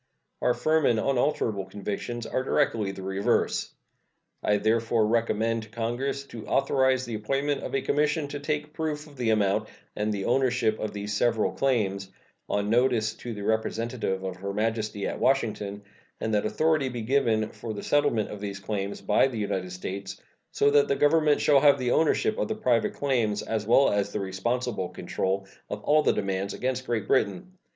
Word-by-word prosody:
Our 125 Hz, -, +2 dB
firm 155 Hz, -1 st, +2 dB
and 115 Hz, -2 st, +3 dB
unalterable 120 Hz, -6 st, 0 dB
convictions 105 Hz, +4 st, -5 dB
are 130 Hz, -, -1 dB
directly 115 Hz, -7 st, +1 dB
the 95 Hz, -1 st, -8 dB
reverse. 95 Hz, +1 st, 0 dB, 0.7 s
I 105 Hz, -, +2 dB
therefore 115 Hz, +1 st, +2 dB
recommend 115 Hz, 0 st, +1 dB
to 110 Hz, -, -12 dB
Congress 120 Hz, +5 st, -2 dB
to 115 Hz, -5 st, -10 dB
authorize 130 Hz, -1 st, +2 dB
the 120 Hz, -, -6 dB
appointment 135 Hz, +7 st, -1 dB
of -, -, -4 dB
a 135 Hz, -, 0 dB
commission 150 Hz, +1 st, +1 dB
to 145 Hz, -, -5 dB
take 150 Hz, +1 st, -3 dB
proof 155 Hz, -2 st, -3 dB
of 150 Hz, -2 st, -15 dB
the 120 Hz, -3 st, -1 dB
amount 100 Hz, -3 st, +2 dB, 0.3 s
and 105 Hz, +1 st, -1 dB
the 100 Hz, -2 st, -3 dB
ownership 120 Hz, -3 st, +2 dB
of 110 Hz, -, -3 dB
these 105 Hz, 0 st, -4 dB
several 115 Hz, 0 st, +2 dB
claims, 100 Hz, -8 st, 0 dB, 0.4 s
on 100 Hz, 0 st, 0 dB
notice 120 Hz, -2 st, +2 dB
to 120 Hz, -2 st, -6 dB
the 100 Hz, -, -6 dB
representative 110 Hz, -2 st, -1 dB
of 95 Hz, -1 st, -4 dB
Her 100 Hz, +2 st, -4 dB
Majesty 110 Hz, -2 st, -1 dB
at -, -, -3 dB
Washington, 105 Hz, -6 st, 0 dB, 0.4 s
and 110 Hz, -, -2 dB
that 105 Hz, 0 st, +2 dB
authority 155 Hz, 0 st, +1 dB
be 120 Hz, -2 st, -5 dB
given 110 Hz, -4 st, +2 dB
for 115 Hz, -, -7 dB
the 105 Hz, -, -6 dB
settlement 145 Hz, -7 st, +1 dB
of 105 Hz, -, -7 dB
these 100 Hz, -1 st, -4 dB
claims 100 Hz, -1 st, -4 dB
by 105 Hz, +5 st, +3 dB
the 125 Hz, -4 st, -5 dB
United 95 Hz, -3 st, -2 dB
States, 95 Hz, +2 st, -6 dB, 0.3 s
so 140 Hz, -, +3 dB
that 145 Hz, 0 st, +5 dB
the 140 Hz, -, +1 dB
Government 150 Hz, +1 st, +3 dB
shall 145 Hz, -2 st, +5 dB
have 145 Hz, 0 st, +6 dB
the 125 Hz, -1 st, -1 dB
ownership 160 Hz, +7 st, +2 dB
of -, -, 0 dB
the 220 Hz, -, -2 dB
private 125 Hz, -, +1 dB
claims, 120 Hz, -7 st, 0 dB
as 110 Hz, -2 st, -3 dB
well 135 Hz, +4 st, +5 dB
as 100 Hz, 0 st, 0 dB
the 105 Hz, -, -2 dB
responsible 100 Hz, +2 st, -2 dB
control 95 Hz, +1 st, -2 dB, 0.2 s
of 105 Hz, 0 st, -5 dB
all 155 Hz, +1 st, +4 dB
the -, -, +3 dB
demands 100 Hz, 0 st, -2 dB
against 130 Hz, 0 st, -2 dB
Great 115 Hz, -4 st, -1 dB
Britain. 100 Hz, -, +1 dB
115 Hz, 180 wpm, -27 LUFS, 105-135 Hz, 0.7 s, have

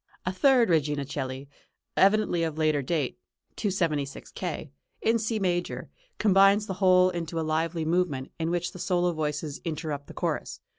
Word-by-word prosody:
A 185 Hz, -, -1 dB
third 250 Hz, +3 st, +4 dB
Regina 145 Hz, -3 st, +1 dB
coeli, 130 Hz, 0 st, -5 dB, 0.5 s
evidently 200 Hz, -3 st, +3 dB
of 160 Hz, -2 st, -2 dB
later 155 Hz, -2 st, +2 dB
date 145 Hz, -1 st, -2 dB, 0.4 s
(276 165 Hz, -9 st, -1 dB
K.), -, -, -5 dB, 0.3 s
in 230 Hz, +1 st, +3 dB
C 220 Hz, +1 st, -1 dB
major, 175 Hz, -3 st, -2 dB, 0.3 s
combines 195 Hz, +1 st, +5 dB
the 195 Hz, -, -3 dB
whole 185 Hz, -1 st, +5 dB
into 165 Hz, -1 st, -3 dB
a 160 Hz, -, -1 dB
lively 160 Hz, +1 st, -1 dB
movement, 160 Hz, -6 st, 0 dB
in 165 Hz, 0 st, 0 dB
which 175 Hz, 0 st, -1 dB
the 185 Hz, -, -11 dB
solo 175 Hz, 0 st, +1 dB
voices 150 Hz, -1 st, -3 dB
interrupt 155 Hz, -3 st, -4 dB
the -, -, -11 dB
chorus. -, -, -2 dB
170 Hz, 155 wpm, -27 LUFS, 150-185 Hz, 0.5 s, combines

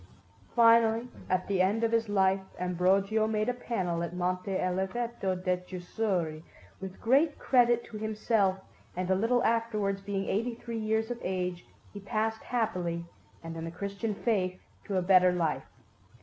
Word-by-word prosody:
Finally, 230 Hz, 0 st, +5 dB, 0.2 s
at 185 Hz, 0 st, +1 dB
the 195 Hz, -2 st, +1 dB
end 205 Hz, +5 st, +2 dB
of 230 Hz, -, +2 dB
his 230 Hz, -1 st, +1 dB
life, 195 Hz, -1 st, +3 dB, 0.2 s
Ambrogio 190 Hz, +4 st, +2 dB
made 215 Hz, 0 st, 0 dB
a 250 Hz, -, +1 dB
panel 185 Hz, -9 st, -2 dB
at 170 Hz, +1 st, -4 dB
Monte 180 Hz, +2 st, -1 dB
Oliveto 190 Hz, +3 st, -1 dB
di 180 Hz, 0 st, 0 dB
Chiusuri 180 Hz, -2 st, -3 dB, 0.4 s
with 190 Hz, -1 st, -8 dB
great 285 Hz, +6 st, +3 dB
credit 240 Hz, -2 st, +3 dB
to 215 Hz, -, -9 dB
himself, 215 Hz, -2 st, +1 dB, 0.4 s
and 185 Hz, 0 st, -1 dB
a -, -, +4 dB
little 230 Hz, +5 st, +2 dB
afterwards, 215 Hz, -4 st, 0 dB
being 195 Hz, -1 st, -3 dB
eighty 230 Hz, +4 st, -1 dB
three 230 Hz, -1 st, -5 dB
years 220 Hz, +1 st, 0 dB
of 240 Hz, -, -4 dB
age, 180 Hz, -1 st, -3 dB, 0.3 s
he 205 Hz, -, -7 dB
passed 220 Hz, +2 st, -2 dB
happily 180 Hz, -8 st, -2 dB, 0.4 s
and 165 Hz, 0 st, -6 dB
in 165 Hz, -, -5 dB
the 165 Hz, -, -4 dB
Christian 200 Hz, +4 st, -4 dB
faith 190 Hz, -5 st, 0 dB, 0.3 s
to 200 Hz, -3 st, -1 dB
a 185 Hz, -, +1 dB
better 185 Hz, 0 st, +6 dB
life. 170 Hz, -4 st, -1 dB
200 Hz, 160 wpm, -30 LUFS, 185-225 Hz, 0.4 s, better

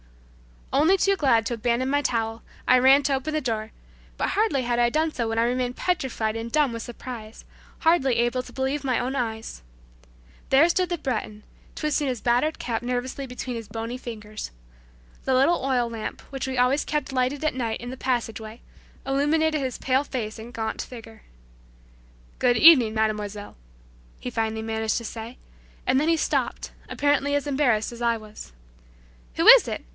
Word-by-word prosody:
Only 315 Hz, +7 st, +5 dB
too 395 Hz, +1 st, +3 dB
glad 235 Hz, -8 st, +3 dB
to 240 Hz, -, -2 dB
abandon 235 Hz, +3 st, 0 dB
my 285 Hz, +1 st, +2 dB
towel, 225 Hz, -3 st, -2 dB, 0.2 s
I 255 Hz, -, +6 dB
ran 270 Hz, +3 st, +6 dB
to 280 Hz, 0 st, +1 dB
open 270 Hz, +4 st, -2 dB
the 310 Hz, -, 0 dB
door, 220 Hz, -4 st, -3 dB, 0.5 s
but -, -, 0 dB
hardly 420 Hz, -11 st, +1 dB
had 240 Hz, 0 st, 0 dB
I 240 Hz, 0 st, +4 dB
done 315 Hz, +5 st, 0 dB
so 235 Hz, -2 st, -2 dB
when 225 Hz, 0 st, -2 dB
I 230 Hz, -, +4 dB
remained 250 Hz, +1 st, -1 dB
petrified 240 Hz, -10 st, -1 dB
and 230 Hz, +1 st, -5 dB
dumb 300 Hz, -4 st, +2 dB
with 230 Hz, -, -5 dB
surprise, 235 Hz, -2 st, -8 dB, 0.4 s
hardly 300 Hz, -7 st, +3 dB
able 240 Hz, +2 st, +1 dB
to -, -, -14 dB
believe 270 Hz, +2 st, -2 dB
my 255 Hz, -3 st, +1 dB
own 255 Hz, +2 st, -2 dB
eyes. 225 Hz, -, -4 dB, 0.9 s
There 275 Hz, +5 st, +6 dB
stood 365 Hz, +1 st, +1 dB
the 350 Hz, 0 st, -2 dB
Breton 215 Hz, -7 st, -4 dB, 0.3 s
twisting 300 Hz, -1 st, 0 dB
his 250 Hz, -4 st, -2 dB
battered 245 Hz, +6 st, +1 dB
cap 230 Hz, -2 st, -3 dB
nervously 250 Hz, +2 st, -3 dB
between 250 Hz, -1 st, -5 dB
his 225 Hz, -2 st, -7 dB
bony 230 Hz, +2 st, -5 dB
fingers. 215 Hz, -4 st, -7 dB, 0.8 s
The 265 Hz, -, +1 dB
little 275 Hz, +6 st, +3 dB
oil 250 Hz, -3 st, +1 dB
lamp, 225 Hz, -2 st, -6 dB
which 270 Hz, -1 st, -4 dB
we 260 Hz, -1 st, -3 dB
always 250 Hz, +4 st, +2 dB
kept 300 Hz, -2 st, -2 dB
lighted 260 Hz, +3 st, 0 dB
at 310 Hz, -, +1 dB
night 230 Hz, -4 st, -3 dB
in 245 Hz, -, -6 dB
the 260 Hz, -, -7 dB
passageway, 225 Hz, -3 st, -3 dB, 0.4 s
illuminated 305 Hz, +3 st, +1 dB
his 260 Hz, -2 st, -3 dB
pale 265 Hz, +2 st, +1 dB
face 225 Hz, -5 st, -4 dB
and 235 Hz, +2 st, -10 dB
gaunt 220 Hz, -1 st, -3 dB
figure. 225 Hz, -3 st, -11 dB, 1.2 s
"Good 245 Hz, -2 st, +3 dB
evening, 250 Hz, -8 st, +7 dB
mademoiselle," 210 Hz, -1 st, -2 dB, 0.6 s
he 250 Hz, -, -5 dB
finally 220 Hz, -1 st, -1 dB
managed 220 Hz, -1 st, -1 dB
to 235 Hz, -, -4 dB
say, 225 Hz, +2 st, -7 dB, 0.5 s
and 260 Hz, +1 st, +3 dB
then 305 Hz, -, 0 dB
he 330 Hz, 0 st, +3 dB
stopped, -, -, -1 dB, 0.2 s
apparently 285 Hz, 0 st, +1 dB
as 285 Hz, -, 0 dB
embarrassed 265 Hz, -7 st, +1 dB
as 235 Hz, 0 st, -10 dB
I 235 Hz, -1 st, +2 dB
was. 215 Hz, -, -12 dB, 0.8 s
"Who -, -, +1 dB
it -, -, +10 dB
is?" -, -, -3 dB
250 Hz, 180 wpm, -25 LUFS, 225-275 Hz, 1.2 s, it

